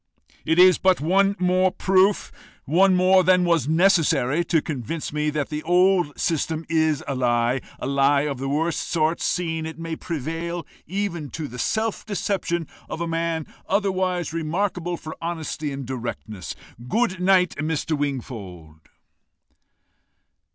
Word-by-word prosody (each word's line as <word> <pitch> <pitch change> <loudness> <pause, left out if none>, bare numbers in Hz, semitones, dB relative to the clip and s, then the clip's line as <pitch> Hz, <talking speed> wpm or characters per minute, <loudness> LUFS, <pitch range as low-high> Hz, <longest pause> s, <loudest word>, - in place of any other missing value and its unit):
"It 160 - +1
is 180 0 +7
but 185 -1 +3
one 195 +6 +2
more 185 +1 +3
proof 190 +2 +2 0.3
more 185 +3 +4
than 180 0 +4
was 165 -5 +2
necessary 160 -4 +3
to 165 -1 +2
convince 150 +1 -5
me 150 0 0
that 150 -2 -2
the 150 -1 -3
old 180 -2 +2
system 160 0 -1
is 160 -3 +1
a 140 - -1
lie 120 0 +1 0.2
a - - -6
lie 140 +1 +3
of 140 -3 -3
the 135 +1 -3
worst 160 +3 0
sort, 160 0 +1
seeing 160 -3 -1
it 160 - -8
may 165 0 -4
prevail 165 +2 -4 0.2
even 175 -4 -3
to 150 +3 -5
the 125 0 -9
self 220 - -1
deception 190 -5 -2 0.2
of - - -5
a 170 - -2
man 165 -1 -1 0.2
otherwise 185 -4 0
remarkable 175 +2 -2
for 155 0 -8
honesty 160 -3 -4
and 135 -1 -5
directness. 115 -6 -6 0.3
Good 210 - 0
night, 180 -1 +4
Mr. 155 +1 -1
Wingfold." 105 - -5
165 Hz, 140 wpm, -23 LUFS, 145-180 Hz, 0.3 s, is